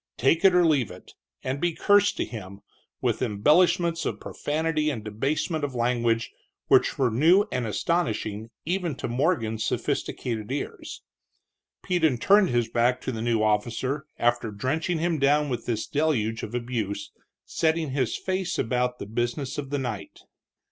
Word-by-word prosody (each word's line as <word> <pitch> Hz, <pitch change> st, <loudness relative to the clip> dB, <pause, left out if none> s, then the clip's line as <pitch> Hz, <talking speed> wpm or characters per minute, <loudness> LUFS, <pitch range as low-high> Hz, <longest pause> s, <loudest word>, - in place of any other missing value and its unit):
Take 155 Hz, +8 st, +2 dB
it 190 Hz, -2 st, +6 dB
or 180 Hz, -1 st, +5 dB
leave 140 Hz, -, +2 dB
it, 90 Hz, 0 st, -13 dB, 0.3 s
and 130 Hz, +2 st, -3 dB
be 175 Hz, -1 st, +1 dB
cursed 205 Hz, +3 st, +3 dB
to -, -, 0 dB
him, 100 Hz, -3 st, -9 dB, 0.4 s
with -, -, 0 dB
embellishments 165 Hz, -, +3 dB
of -, -, -3 dB
profanity 155 Hz, 0 st, -1 dB
and 120 Hz, -8 st, -4 dB
debasement 145 Hz, -, -2 dB
of 140 Hz, -3 st, -3 dB
language 120 Hz, -2 st, +1 dB, 0.4 s
which -, -, +4 dB
were 125 Hz, -3 st, +2 dB
new 165 Hz, -, +5 dB
and 125 Hz, -2 st, -1 dB
astonishing 110 Hz, -, -1 dB, 0.2 s
even 175 Hz, -3 st, -1 dB
to -, -, -4 dB
Morgan's 120 Hz, -5 st, 0 dB
sophisticated 115 Hz, -2 st, -2 dB
ears. 140 Hz, -, -5 dB, 0.8 s
Peden 160 Hz, -8 st, +2 dB
turned 195 Hz, -, +4 dB
his 120 Hz, -2 st, +1 dB
back 120 Hz, +2 st, +1 dB
to -, -, -3 dB
the 110 Hz, -2 st, -5 dB
new 115 Hz, -2 st, +1 dB
officer 120 Hz, +7 st, 0 dB
after 120 Hz, -1 st, +1 dB
drenching 145 Hz, -, -1 dB
him 165 Hz, -1 st, 0 dB
down 145 Hz, +2 st, +3 dB
with 120 Hz, -3 st, -4 dB
this 115 Hz, -3 st, -1 dB
deluge 125 Hz, -8 st, 0 dB
of 115 Hz, -, -6 dB
abuse, 115 Hz, -5 st, -3 dB, 0.3 s
setting 160 Hz, -2 st, 0 dB
his 130 Hz, -4 st, 0 dB
face 185 Hz, -1 st, -2 dB
about 125 Hz, +1 st, 0 dB
the -, -, -6 dB
business 120 Hz, +6 st, -2 dB
of 140 Hz, -2 st, -5 dB
the 145 Hz, -, -1 dB
night. 115 Hz, -7 st, -5 dB
130 Hz, 155 wpm, -26 LUFS, 115-160 Hz, 0.8 s, it